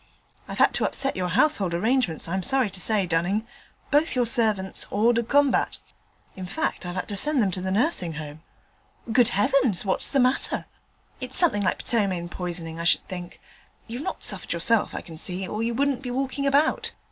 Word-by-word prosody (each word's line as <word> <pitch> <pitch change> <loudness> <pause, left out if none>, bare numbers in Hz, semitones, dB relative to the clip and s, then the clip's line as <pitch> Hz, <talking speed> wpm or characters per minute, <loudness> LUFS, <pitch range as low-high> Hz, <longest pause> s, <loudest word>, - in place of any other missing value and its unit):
'I've - - -7
had - - +4
to - - 0
upset 275 0 0
your 185 -1 -1
household 190 - +2
arrangements, 220 - 0
I'm 190 +3 -1
sorry 260 -1 +1
to 185 -1 -2
say, 210 -2 +1
Dunning. 180 +6 0 0.5
Both 295 +2 +2
your 250 -1 +2
servants 215 -5 0
hors 225 +4 +3
de 235 - +1
combat. 275 +3 +2 0.6
In 185 -1 -7
fact, 315 - -3
I've 175 - -5
had 185 - -3
to 205 - -3
send 295 +7 +2
them 200 -5 +2
to 185 - -3
the 190 - -3
Nursing 195 - +1
Home.' 150 0 -8 0.7
'Good 240 -1 +5
heavens! 235 -2 +1
what's 190 - +2
the 275 - +2
matter?' 255 +1 +2 0.5
'It's 255 0 -3
something 325 - +2
like 190 - -1
ptomaine 190 -7 0
poisoning, 170 -3 -5
I - - -3
should 165 - +2
think: 180 -1 -8 0.5
you've 240 +3 -6
not - - -5
suffered 200 -7 -2
yourself, 205 +7 +1
I - - -4
can 165 -3 -11
see, 185 +2 -2
or 210 - -4
you 230 +1 -1
wouldn't 275 0 0
be 255 - -6
walking 270 +2 -2
about. 285 +3 +2
210 Hz, 195 wpm, -25 LUFS, 180-255 Hz, 0.7 s, Good